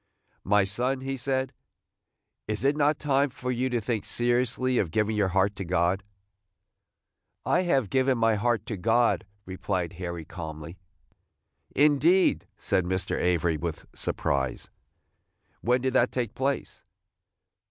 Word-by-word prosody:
"My 105 +1 +3
son," 125 +7 -1
he 135 0 -3
said, 130 0 -1 0.9
"is 105 +2 -2
it 140 +2 +3
not 150 0 +2
time 140 -1 +1
for 125 0 -4
you 125 +1 0
to 120 -1 0
think 110 -1 -2
seriously 125 +1 +1
of 95 - 0
giving 110 +5 0
your 105 -2 +2
heart 95 +2 +1
to 95 - -3
God?" 90 +2 +1 1.4
"I 180 - +3
have 130 - +2
given 130 -1 +2
my 115 -1 +3
heart 110 0 0
to 110 - -4
God," 115 +3 +2 0.2
replied 95 -2 -3
Harry, 85 -2 -5
calmly. 80 0 -8 1.0
"Indeed!" 150 +6 +4
said 95 - 0
Mr. 95 +1 -1
Avery, 85 -2 +1
with 85 0 -5
surprise; 65 -3 -2 0.9
"when 125 +2 +2
did 130 0 -1
that - - +3
take 120 -3 -2
place?" 135 +3 -2
115 Hz, 135 wpm, -27 LUFS, 95-130 Hz, 1.4 s, Indeed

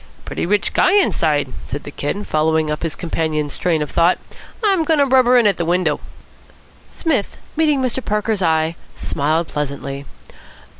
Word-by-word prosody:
"Pretty - - -3
rich 205 +2 +2
guy 375 - +4
inside," 150 - +2
said 145 +3 -5
the 145 - -8
Kid, 170 +9 -3
following 155 0 +1
up 150 - -3
his 165 -2 -3
companion's 155 -4 -2
train 165 -4 0
of 150 - -7
thought. 170 +2 +3 0.5
"I'm 390 -5 +3
goin' 320 0 +2
to 285 - +4
rubber 255 -2 +5
in 240 - +4
at 205 - +3
the 170 - -1
window." 170 -3 +1 0.9
Psmith, 290 - -1 0.2
meeting 300 -4 +2
Mr. 255 +1 -1
Parker's 210 0 -1
eye, 160 -1 +1 0.2
smiled 155 +4 -1
pleasantly. 140 -1 -4
170 Hz, 160 wpm, -19 LUFS, 150-245 Hz, 0.9 s, rubber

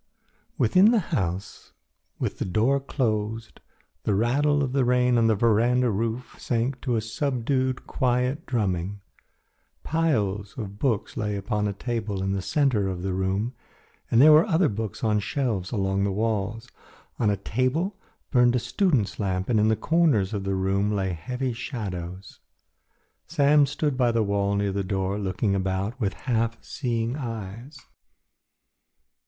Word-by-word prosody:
Within 185 - +5
the 235 - +4 0.2
house, 95 - -3 0.4
with - - -3
the - - 0
door 115 +9 +2
closed, 110 -4 -2 0.4
the 105 - 0
rattle 145 +7 +2
of 130 -2 -2
the 135 -1 +2
rain 125 0 +3
on 115 -1 +4
the 110 - +3
veranda 120 +3 +3
roof 115 +4 -3
sank 125 +2 -1
to 125 -4 0
a 110 - +1
subdued, 130 +2 -1
quiet 125 +4 0
drumming. 100 -4 -1 0.8
Piles 105 -10 0
of 100 -3 -6
books 115 -6 -1
lay 105 -1 -1
upon 105 +1 -1
a 100 - -2
table 105 -3 -3
in 95 - -1
the 100 0 -1
centre 125 -4 +1
of 90 -2 -4
the 95 -1 -1
room 95 +6 -1 0.6
and 115 - +3
there 150 +4 +8
were 155 +3 +6
other 170 -1 +3
books 110 0 -5
on 110 -1 +2
the - - 0
shelves 105 -5 -2
along 95 -2 0
the 100 - +1
walls. 110 +2 -2 0.5
On 110 - +3
a 100 - +1
table 130 - -1 0.4
burned 125 -2 +4
a - - +3
student's 125 - 0
lamp 95 -2 -1
and 115 -3 +3
in 105 - +3
the 110 - +3
corners 145 - +2
of 100 -2 -3
the 95 0 0
room 95 +2 +1
lay 95 -2 0
heavy 125 +10 -3
shadows. 95 - -6 0.9
Sam 145 -2 +4
stood 145 -1 -1
by 125 -2 +3
the 115 -1 +1
wall 100 0 0
near 100 0 0
the 100 +1 -1
door 95 +1 -1
looking 100 +1 -1
about 95 +5 -2
with 100 -2 0
half 115 -2 0
seeing 120 -2 -2
eyes. 115 +1 -6
115 Hz, 160 wpm, -25 LUFS, 100-130 Hz, 0.9 s, there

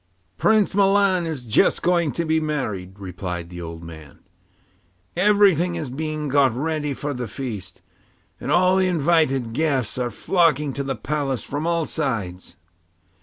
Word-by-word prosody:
'Prince 215 -2 +3
Milan 195 -3 +3
is 150 -6 -4
just 110 -3 +2
going 170 -3 +2
to 170 - -2
be 160 0 +2
married,' 110 -12 -3
replied 90 -2 -6
the 90 0 -7
old 85 0 -7
man. 80 -3 -11 1.0
'Everything 185 -3 +4
is 155 -7 -4
being 155 +2 -3
got 140 -1 +4
ready 150 +1 -2
for 145 +2 -3
the 125 -2 -4
feast, 105 -7 -7 0.6
and - - -4
all 185 +1 +4
the 190 -1 +3
invited 150 -8 +1
guests 135 -5 0
are 125 -1 0
flocking 150 -2 +1
to 140 - -3
the 135 -1 -2
palace 135 0 -2
from 145 +3 -3
all 170 -1 +1
sides. 110 - -3
145 Hz, 150 wpm, -22 LUFS, 115-170 Hz, 1.0 s, Everything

